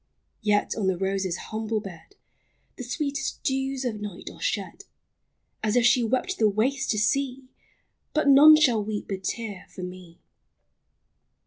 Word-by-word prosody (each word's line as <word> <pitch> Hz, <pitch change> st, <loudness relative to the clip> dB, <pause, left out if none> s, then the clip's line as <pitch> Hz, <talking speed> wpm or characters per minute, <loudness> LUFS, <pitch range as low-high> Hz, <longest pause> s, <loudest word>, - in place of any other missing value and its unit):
Yet 210 Hz, -1 st, +1 dB
on 210 Hz, -4 st, -1 dB
the 190 Hz, -2 st, +1 dB
rose's 190 Hz, -1 st, -1 dB
humble 220 Hz, 0 st, -3 dB
bed 195 Hz, -, -11 dB, 0.6 s
The 255 Hz, -, -7 dB
sweetest 285 Hz, +4 st, -3 dB
dews 270 Hz, 0 st, -1 dB
of 215 Hz, -4 st, -3 dB
night 205 Hz, -4 st, -7 dB
are -, -, -16 dB
shed, -, -, -3 dB, 0.8 s
As 215 Hz, +1 st, 0 dB
if 245 Hz, -1 st, +4 dB
she 240 Hz, 0 st, +4 dB
wept 260 Hz, -, -1 dB
the 215 Hz, -, +4 dB
waste 255 Hz, +7 st, 0 dB
to 215 Hz, -, +1 dB
see, 260 Hz, +4 st, 0 dB, 0.3 s
— -, -, -48 dB
But 305 Hz, -1 st, +2 dB
none 290 Hz, +3 st, +9 dB
shall 245 Hz, -9 st, +3 dB
weep 210 Hz, -1 st, -5 dB
a 195 Hz, -, -2 dB
tear 205 Hz, 0 st, -5 dB
for 185 Hz, -, -9 dB
me! 180 Hz, -1 st, -9 dB
LIFE. -, -, -31 dB
225 Hz, 160 wpm, -26 LUFS, 200-270 Hz, 0.8 s, none